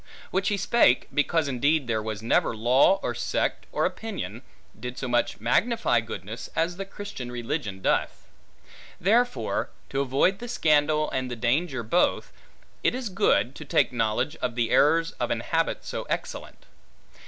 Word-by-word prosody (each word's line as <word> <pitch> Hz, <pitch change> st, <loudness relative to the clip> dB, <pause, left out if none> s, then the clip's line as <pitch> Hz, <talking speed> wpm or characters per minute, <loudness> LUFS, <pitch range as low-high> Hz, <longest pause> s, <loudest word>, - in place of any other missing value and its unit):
Which 190 Hz, +1 st, 0 dB
he 205 Hz, -, +1 dB
spake, 200 Hz, -, +3 dB
because 145 Hz, +2 st, +1 dB
indeed 140 Hz, +3 st, +1 dB
there 110 Hz, -2 st, -1 dB
was 110 Hz, -1 st, -5 dB
never 115 Hz, 0 st, +2 dB
law, 130 Hz, -, +4 dB
or -, -, -1 dB
sect, -, -, -2 dB
or -, -, +1 dB
opinion, 160 Hz, -, -4 dB, 0.4 s
did 125 Hz, 0 st, -6 dB
so 135 Hz, -, -3 dB
much 120 Hz, 0 st, 0 dB
magnify 125 Hz, -, +2 dB
goodness, 110 Hz, 0 st, -7 dB
as 170 Hz, +2 st, 0 dB
the 195 Hz, -, -4 dB
Christian 195 Hz, -11 st, -7 dB
religion 115 Hz, -5 st, -4 dB
doth. -, -, 0 dB, 0.7 s
Therefore, 240 Hz, +7 st, +1 dB, 0.2 s
to 135 Hz, -, -1 dB
avoid 140 Hz, +9 st, +2 dB
the 240 Hz, -, -6 dB
scandal 155 Hz, -5 st, +2 dB
and 130 Hz, -1 st, -2 dB
the 120 Hz, -, -4 dB
danger 130 Hz, +3 st, 0 dB
both, 145 Hz, +11 st, +1 dB, 0.5 s
it -, -, +2 dB
is 255 Hz, -4 st, -3 dB
good, 140 Hz, -, +2 dB
to 155 Hz, -, -9 dB
take 135 Hz, -, +2 dB
knowledge 115 Hz, +6 st, 0 dB
of 120 Hz, -2 st, -3 dB
the 120 Hz, -2 st, 0 dB
errors 165 Hz, +3 st, +4 dB
of -, -, -1 dB
an -, -, -1 dB
habit -, -, -1 dB
so -, -, -4 dB
excellent. -, -, -5 dB
140 Hz, 160 wpm, -26 LUFS, 120-180 Hz, 0.7 s, law